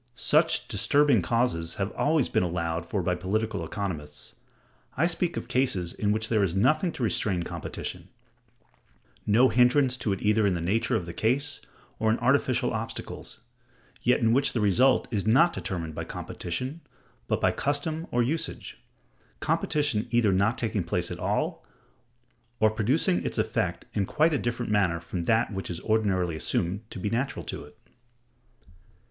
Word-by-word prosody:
Such 155 +6 +3
disturbing 125 +2 +3
causes 85 -7 0
have 100 -1 -2
always 150 -3 +1
been - - +1
allowed 85 -1 -2
for 95 +1 -1
by 90 +1 +1
political 100 +2 -2
economists. 80 -5 -4 0.6
I 155 - +3
speak 175 0 0
of - - -4
cases 100 -10 0
in 105 -1 0
which 110 +1 0
there 110 -2 +2
is 95 -2 0
nothing 155 - +2
to 125 - -4
restrain 100 -5 +1
competition; - - -6 1.2
no 120 +5 +5
hindrance 125 +1 +3
to 110 - -1
it 95 - -3
either 105 0 +3
in 95 - +1
the - - -2
nature 95 +7 0
of 100 -6 -1
the 85 - -7
case 130 +9 -1 0.4
or 110 - +2
in 110 - +2
artificial 125 -1 +2
obstacles; 110 +1 -6 0.6
yet 125 - +3
in 115 0 +3
which 135 +2 +3
the 120 - 0
result 120 +6 +3
is 105 -2 -1
not 165 +10 +5
determined 85 -7 -4
by - - -4
competition, 130 - -5 0.5
but - - 0
by - - +3
custom 150 +4 -2
or 120 - +2
usage; 155 +7 -3 0.6
competition 145 -7 0
either 120 -3 +3
not 100 +6 +2
taking 110 -5 -1
place 85 - -2
at - - -6
all, - - -1 1.0
or 110 0 +4
producing 110 - +1
its - - -3
effect - - -1
in 100 -2 0
quite 155 +2 +2
a 145 - +1
different 120 -1 -2
manner 95 -5 +2
from 85 +1 -5
that 115 +1 +2
which 95 0 -4
is 85 -1 -4
ordinarily 95 -6 +1
assumed 85 +5 -1
to - - -8
be 95 - -3
natural 130 +4 -2
to - - -5
it. 75 - -16
110 Hz, 165 wpm, -27 LUFS, 95-130 Hz, 1.2 s, no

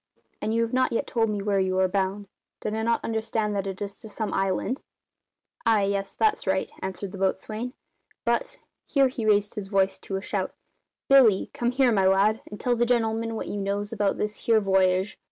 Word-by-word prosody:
And 215 - -1
you 230 +1 +2
have 230 - -3
not 255 0 +2
yet 230 - 0
told 225 -2 +1
me 205 -2 -2
where 200 -1 +1
you 185 0 +1
are 190 0 +4
bound. 195 +2 -1 0.3
Did 215 - -2
I 220 - -1
not 230 +1 0
understand 220 -1 -1
that 195 -1 -1
it 190 -1 -5
is 200 0 -6
to 220 - -11
some 215 +1 -3
island?" 195 +7 0 0.8
"Ay, 225 -3 +3
yes, 195 0 -1
that's 435 0 +1
right," - - 0
answered 190 0 -4
the 195 - -8
boatswain, 215 +5 -2 0.5
"but," - - 0 0.3
here 275 -2 +3
he 235 -4 -3
raised 205 -1 +3
his 210 -3 -5
voice 195 -1 +1
to 195 - -5
a - - 0
shout - - -3 0.5
"Billy, 245 -8 +5
come 240 - 0
here, 255 0 +3
my 195 -3 +3
lad, 200 +3 +3
and 210 - -8
tell 245 -1 +1
the 240 - +2
gen'leman 225 -1 0
what - - -4
you - - -4
knows 200 +2 -2
about 205 -3 0
this 210 0 -2
here 225 -1 +5
v'yage." 190 -1 +2
210 Hz, 210 wpm, -26 LUFS, 195-230 Hz, 0.8 s, Billy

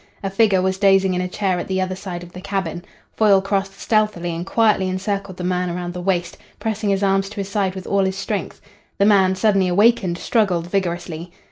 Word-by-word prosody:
A 195 - -2
figure 195 -2 +3
was 190 0 0
dozing 195 -1 +4
in 180 - 0
a 180 - -2
chair 185 -1 -1
at - - -5
the 190 0 -1
other 185 0 -1
side 180 -2 -6
of 175 - -12
the 180 - -8
cabin. 190 -3 -3 0.3
Foyle 205 -3 +5
crossed 195 0 -2
stealthily 210 -6 0
and 170 +3 -5
quietly 210 -4 +2
encircled 195 0 -3
the 180 - -5
man 180 0 0
around 175 0 -4
the 180 - -5
waist, 175 -1 -1 0.2
pressing 220 -1 -2
his 195 0 +1
arms 195 0 +2
to 215 - -11
his 200 -2 -4
side 195 -2 -1
with 190 - -7
all 200 -1 +1
his 190 0 -2
strength. 200 -1 -4 0.4
The 200 - +3
man, 190 -3 +4
suddenly 195 -2 +2
awakened, 195 -1 +3
struggled 185 -5 +1
vigorously. 175 -2 -3
190 Hz, 215 wpm, -21 LUFS, 180-200 Hz, 0.4 s, Foyle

